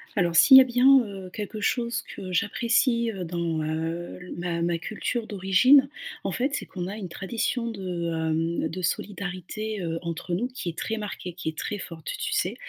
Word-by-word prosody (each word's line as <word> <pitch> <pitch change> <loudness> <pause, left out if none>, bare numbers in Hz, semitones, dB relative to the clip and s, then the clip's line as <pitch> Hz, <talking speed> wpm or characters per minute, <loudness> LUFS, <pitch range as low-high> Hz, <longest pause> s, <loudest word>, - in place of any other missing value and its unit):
Alors, 175 -4 +1
s'il 265 - +9
y - - +12
a - - +7
bien, 255 +2 +6
heu, 195 -2 -8
quelque 210 0 -5
chose 235 +2 0
que 185 - -7
j'apprécie, 235 +4 +2
heu, 190 -3 -5
dans, 165 -2 -2
heu, 165 +2 -3
l 180 - -8
ma 170 -1 -2
ma 170 0 +1
culture 220 +6 -3
d'origine, 215 +8 +5 0.3
en - - -1
fait, 265 +4 0
c'est - - -3
qu'on 180 -2 -5
a 200 - -5
une 190 -4 -6
tradition 230 +6 -2
de, 180 -5 -3
hem, 160 0 0
de 185 +4 -5
solidarité, 200 +3 -3
heu, 165 -1 -2
entre 170 +1 -3
nous 235 +8 -1
qui 250 -8 -5
est 165 - -8
très 225 - -2
marquée, 205 -4 -5
qui 175 -2 -4
est 155 - -8
très 205 - -3
forte, 165 -4 -9
tu - - -2
sais? - - 0
185 Hz, 200 wpm, -26 LUFS, 170-225 Hz, 0.3 s, y